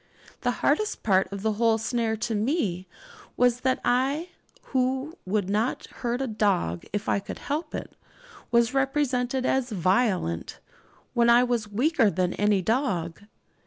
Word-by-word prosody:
The -, -, +1 dB, 0.2 s
hardest 430 Hz, 0 st, +1 dB
part 195 Hz, -2 st, +2 dB
of 200 Hz, 0 st, -6 dB
the 220 Hz, -, +2 dB
whole 225 Hz, +1 st, +2 dB
snare 225 Hz, 0 st, -1 dB
to 230 Hz, +1 st, -2 dB
me 210 Hz, -, -1 dB, 0.5 s
was, 245 Hz, -1 st, +3 dB
that 260 Hz, 0 st, +1 dB
I, 275 Hz, +8 st, +1 dB, 0.4 s
who 260 Hz, +3 st, 0 dB
would 200 Hz, -1 st, 0 dB
not 215 Hz, +5 st, -1 dB, 0.2 s
hurt 245 Hz, +2 st, -1 dB
a -, -, -2 dB
dog 195 Hz, -, 0 dB
if 205 Hz, +1 st, -3 dB
I -, -, +2 dB
could -, -, -7 dB
help 300 Hz, +2 st, -4 dB
it, -, -, -7 dB, 0.5 s
was 235 Hz, +1 st, +3 dB
represented 270 Hz, -2 st, 0 dB
as 265 Hz, -1 st, +1 dB
'violent' 185 Hz, -, 0 dB, 0.5 s
when 235 Hz, -1 st, +3 dB
I 240 Hz, +1 st, +6 dB
was 235 Hz, -4 st, -1 dB
weaker 245 Hz, +1 st, +3 dB
than 185 Hz, -2 st, 0 dB
any 205 Hz, -2 st, +2 dB
dog. 190 Hz, -, -1 dB
235 Hz, 150 wpm, -26 LUFS, 205-260 Hz, 0.5 s, I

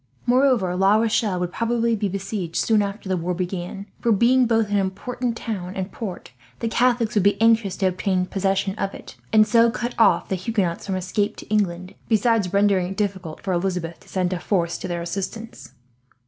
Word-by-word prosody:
Moreover, 245 Hz, -7 st, +3 dB
La 195 Hz, +3 st, +4 dB
Rochelle 215 Hz, -3 st, +1 dB
would 180 Hz, 0 st, -2 dB
probably 230 Hz, 0 st, +1 dB
be 205 Hz, -2 st, -1 dB
besieged, 195 Hz, -3 st, -4 dB
soon 220 Hz, -2 st, +3 dB
after 200 Hz, 0 st, -4 dB
the 190 Hz, -, +1 dB
war 180 Hz, +1 st, -2 dB
began; 180 Hz, +2 st, -4 dB
for 235 Hz, -, +1 dB
being 240 Hz, +4 st, +4 dB
both 225 Hz, -2 st, +1 dB
an 205 Hz, -, +2 dB
important 230 Hz, +5 st, -3 dB
town 190 Hz, -6 st, -5 dB
and 190 Hz, +1 st, -4 dB
port, 190 Hz, -, -7 dB, 0.3 s
the 230 Hz, -, -2 dB
Catholics 240 Hz, 0 st, +2 dB
would 210 Hz, -, +3 dB
be 200 Hz, +1 st, +3 dB
anxious 225 Hz, -4 st, +3 dB
to 195 Hz, -, 0 dB
obtain 185 Hz, 0 st, 0 dB
possession 195 Hz, 0 st, 0 dB
of 195 Hz, -, -2 dB
it, -, -, -11 dB, 0.2 s
and 215 Hz, -1 st, +6 dB
so 230 Hz, 0 st, +5 dB
cut 240 Hz, +1 st, -3 dB
off 225 Hz, -, +4 dB
the -, -, -2 dB
Huguenots 185 Hz, -2 st, -2 dB
from 190 Hz, -, -1 dB
escape 190 Hz, +3 st, -1 dB
to -, -, -11 dB
England, 185 Hz, -3 st, -1 dB, 0.2 s
besides 220 Hz, -3 st, +2 dB
rendering 200 Hz, -2 st, +3 dB
it 195 Hz, +2 st, -7 dB
difficult 190 Hz, -6 st, -3 dB
for 190 Hz, -, -1 dB
Elizabeth 175 Hz, -2 st, -2 dB
to -, -, -20 dB
send 185 Hz, -1 st, -1 dB
a 180 Hz, -, -3 dB
force 170 Hz, -3 st, -1 dB
to -, -, -5 dB
their 175 Hz, -1 st, -3 dB
assistance. 195 Hz, -, -6 dB
200 Hz, 195 wpm, -23 LUFS, 185-225 Hz, 0.3 s, and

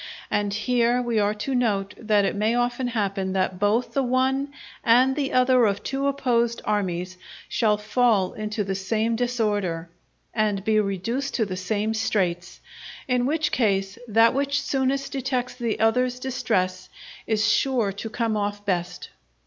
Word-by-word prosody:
And 205 Hz, -1 st, 0 dB
here 240 Hz, +3 st, +1 dB
we 240 Hz, -3 st, 0 dB
are 205 Hz, 0 st, +1 dB
to 240 Hz, +6 st, -3 dB
note 205 Hz, -5 st, 0 dB
that 210 Hz, -2 st, +2 dB
it -, -, -1 dB
may 215 Hz, +3 st, +1 dB
often 245 Hz, +1 st, 0 dB
happen 195 Hz, -5 st, -1 dB
that 185 Hz, -1 st, -1 dB
both 210 Hz, +4 st, +1 dB
the 275 Hz, -, +2 dB
one 265 Hz, +2 st, +1 dB, 0.3 s
and 255 Hz, +3 st, +4 dB
the 285 Hz, -2 st, -1 dB
other 255 Hz, -2 st, +4 dB
of 200 Hz, 0 st, -2 dB
two 275 Hz, +1 st, -1 dB
opposed 235 Hz, -4 st, +1 dB
armies 185 Hz, -3 st, -2 dB, 0.3 s
shall 215 Hz, -3 st, +2 dB
fall 215 Hz, -3 st, +1 dB
into 215 Hz, 0 st, -3 dB
the 195 Hz, 0 st, -2 dB
same 220 Hz, +4 st, -1 dB
disorder, 205 Hz, -9 st, -1 dB, 0.4 s
and 210 Hz, -3 st, 0 dB
be 215 Hz, -1 st, +3 dB
reduced 215 Hz, +7 st, -2 dB
to 225 Hz, -, +1 dB
the 185 Hz, -2 st, -4 dB
same 210 Hz, +4 st, -1 dB
straits; 185 Hz, -5 st, -1 dB, 0.5 s
in 250 Hz, -1 st, +1 dB
which 310 Hz, +2 st, 0 dB
case, 195 Hz, -3 st, 0 dB
that 225 Hz, +1 st, +4 dB
which 280 Hz, +1 st, 0 dB
soonest 270 Hz, 0 st, -1 dB
detects 255 Hz, -2 st, -2 dB
the 235 Hz, -3 st, -3 dB
other's 250 Hz, +3 st, +2 dB
distress 185 Hz, -8 st, -1 dB, 0.4 s
is 220 Hz, 0 st, +1 dB
sure 230 Hz, -2 st, +2 dB
to 205 Hz, +3 st, -6 dB
come 225 Hz, -1 st, -1 dB
off 205 Hz, 0 st, -3 dB
best. 180 Hz, -3 st, -2 dB
225 Hz, 155 wpm, -24 LUFS, 200-250 Hz, 0.5 s, and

